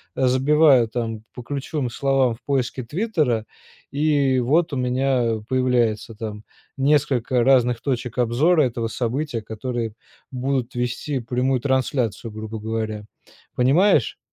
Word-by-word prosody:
забиваю 130 0 +4
там 115 -1 -4
по 125 - -9
ключевым 140 0 -3
словам 135 -1 +1
в - - -23
поиске 130 -2 -1
"Твиттера" 150 - -1 0.5
и 140 -2 +2
вот 155 +7 +2
у - - -1
меня 125 -2 +1
появляется, 120 -4 +1
там, 105 -1 -6 0.3
несколько 135 -3 +2
разных 125 -3 +3
точек 125 -2 -3
обзора 145 +8 +3
этого 115 -3 -1
события, 125 +2 -2
которые 115 +1 -4 0.4
будут 130 -1 -2
вести 125 +3 -2
прямую 125 +2 0
трансляцию, 125 -5 -1
грубо 110 +1 -6
говоря. 110 -1 -3 0.5
Понимаешь? 145 - +3
125 Hz, 115 wpm, -22 LUFS, 115-135 Hz, 0.5 s, забиваю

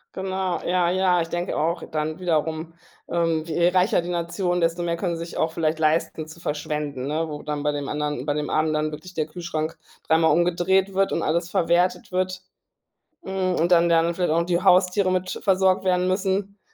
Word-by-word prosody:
Genau, 190 -1 -2
ja, 175 -1 +2
ja. 185 -1 +2
Ich 165 - -2
denke 175 +2 -3
auch 165 +3 0
dann 155 +2 -2
wiederum, 160 -1 -1 0.4
ähm, 165 -2 +1
je 170 +1 +1
reicher 180 +1 +3
die 170 - -7
Nation, 175 +1 -1
desto 165 +1 +1
mehr 170 -1 -1
können 170 -1 -2
sich 170 +1 -7
auch 160 - 0
vielleicht 160 -1 0
leisten, 160 0 0
zu 160 - -12
verschwenden, 150 -4 -3
ne, 160 +2 -1
wo 150 -1 -7
dann 150 -1 -3
bei 150 0 +1
dem 145 -1 -4
anderen 150 -3 -2
bei 145 - 0
dem 150 0 -3
Armen 155 0 +1
dann 155 0 -1
wirklich 180 +5 -9
der 155 -3 -1
Kühlschrank 160 -1 -4 0.3
dreimal 160 0 +4
umgedreht 180 +3 +2
wird 195 +1 +1
und - - 0
alles 170 +3 0
verwertet 175 +2 +1
wird, 185 0 -1 0.8
hm, 190 -1 -1
und 170 +2 +1
dann 170 0 +5
der 165 - +5
andere 170 +1 +2
vielleicht 175 -2 0
auch 165 - +3
noch 170 - -2
die 175 0 0
Haustiere 185 0 +4
mit 185 0 -2
versorgt 190 -1 +3
werden 180 0 +2
müssen, 195 +1 -1
170 Hz, 200 wpm, -24 LUFS, 155-185 Hz, 0.8 s, dann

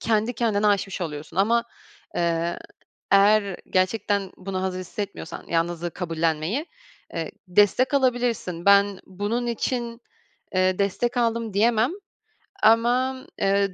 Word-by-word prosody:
kendi 220 +1 +1
kendine 215 -3 +1
aşmış 200 -1 +1
oluyorsun 155 -2 -6
ama, 230 +5 +3 0.5
eee, 170 0 0 0.5
eğer 200 -1 +4
gerçekten 195 +1 0
buna 185 0 -4
hazır 185 -1 -2
hissetmiyorsan 185 -2 -6
yalnızlığı 170 +1 -1
kabullenmeyi, 165 - -1 0.5
eee, - - -3 0.2
destek 205 +8 +3
alabilirsin. 245 -10 0
Ben 200 -1 +5
bunun 205 +6 -2
için, 235 0 -2 0.5
eee, 185 0 +2
destek 220 +5 0
aldım 230 -3 0
diyemem 225 +4 +3 0.7
ama, 245 +4 +3 0.2
eee, 195 0 +2
200 Hz, 110 wpm, -24 LUFS, 185-230 Hz, 0.7 s, Ben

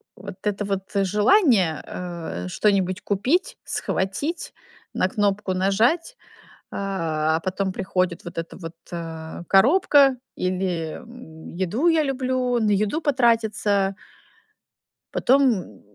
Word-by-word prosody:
Вот 195 0 -9
это 205 -1 -1
вот 195 -1 -2
желание, 205 - +3
э, 170 - -6
что-нибудь 190 - +1
купить, 265 - 0
схватить, 240 - -3 0.4
на 185 - +1
кнопку 205 -1 0
нажать, 220 - +1 0.6
а, 160 -5 -1
а - - -3
потом 190 +1 -2
приходит 185 -2 -1
вот 175 - -9
эта 165 0 -5
вот, 165 -2 -8 0.2
э, 165 -1 -6
коробка 275 - +5 0.2
или 180 -3 -2 0.6
еду 205 - +1
я 325 -2 +4
люблю, 255 -2 0
на 220 -2 +1
еду 210 +10 +1
потратиться. 220 -7 +1 1.2
Потом, 245 - +2
195 Hz, 105 wpm, -23 LUFS, 180-245 Hz, 1.2 s, коробка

